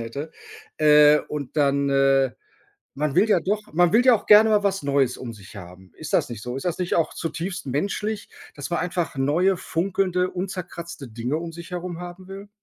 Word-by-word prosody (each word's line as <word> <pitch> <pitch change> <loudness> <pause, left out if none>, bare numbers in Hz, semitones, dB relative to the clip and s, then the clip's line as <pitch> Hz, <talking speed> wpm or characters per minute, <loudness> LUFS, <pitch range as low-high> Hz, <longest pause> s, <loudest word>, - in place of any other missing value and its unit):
hätte. 140 +7 -6 0.5
Äh, 150 -1 +6
und 145 -1 -6
dann, 140 -1 +2
äh 135 -1 +3 0.6
man 150 0 -2
will 200 +5 +4
ja 195 - +4
doch 205 +6 -1
man 175 +3 +3
will 245 +3 +4
ja 255 - +7
auch 210 - -6
gerne 215 +1 +7
mal 210 -1 +3
was 195 -3 0
Neues 140 -3 +1
um 120 -2 -7
sich 105 -1 -14
haben. 90 0 -12
Ist 155 -1 -8
das - - +2
nicht 115 -4 -7
so? 125 +3 -5
Ist 135 - -7
das 175 -1 -2
nicht 180 -1 -1
auch 165 - 0
zutiefst 170 +3 -5
menschlich, 200 +9 -2 0.3
dass 145 -1 -6
man 170 - 0
einfach 175 -4 -2
neue 160 +8 +2
funkelnde 180 +1 -1
unzerkratzte 175 -5 -6
Dinge 120 +6 -3
um 165 0 -6
sich 170 +2 -10
herum 175 -1 -5
haben 180 +1 -9
will? 195 +1 -9
165 Hz, 200 wpm, -23 LUFS, 140-185 Hz, 0.6 s, ja